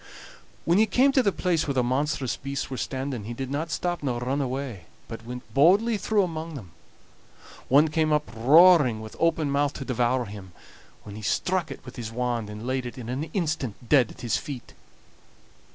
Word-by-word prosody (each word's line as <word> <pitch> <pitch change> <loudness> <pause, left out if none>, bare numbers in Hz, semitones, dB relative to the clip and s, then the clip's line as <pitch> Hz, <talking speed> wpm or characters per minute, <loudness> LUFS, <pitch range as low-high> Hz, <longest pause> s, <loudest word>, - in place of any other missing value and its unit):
When 170 +4 +3
he 220 - +4
came 260 +6 +4
to 270 - +4
the 200 - +2
place 170 -4 0
where 140 - -1
the 125 - +2
monstrous 130 +1 -1
beasts 140 0 -5
were 130 - -3
standing, 130 -5 -4
he 120 +2 -6
did 135 +1 -5
not 155 +4 -2
stop 175 +2 -2
nor 125 -4 -2
run 130 +4 -1
away, 130 - -4 0.2
but 115 -1 -8
went 125 +2 -7
boldly 195 - +4
through 205 +1 +2
among 165 -2 -5
them. 100 -11 -9 1.0
One 145 +4 +5
came 155 0 +1
up 150 0 +1
roaring 145 0 +6
with 110 0 -9
open 165 -3 +1
mouth 145 0 +1
to 135 - -7
devour 125 0 0
him, 100 -3 -10 0.5
when 105 -1 -9
he 110 - -8
struck 180 - 0
it - - -9
with 125 0 -11
his 115 -2 -5
wand, 120 -2 -2
and 105 +2 -8
laid 130 0 -2
it 120 - -9
in 120 -2 -7
an 135 +5 -2
instant 150 - -3
dead 130 -6 +5
at - - -13
his 120 -3 0
feet. 135 -5 -8
135 Hz, 200 wpm, -26 LUFS, 120-160 Hz, 1.0 s, roaring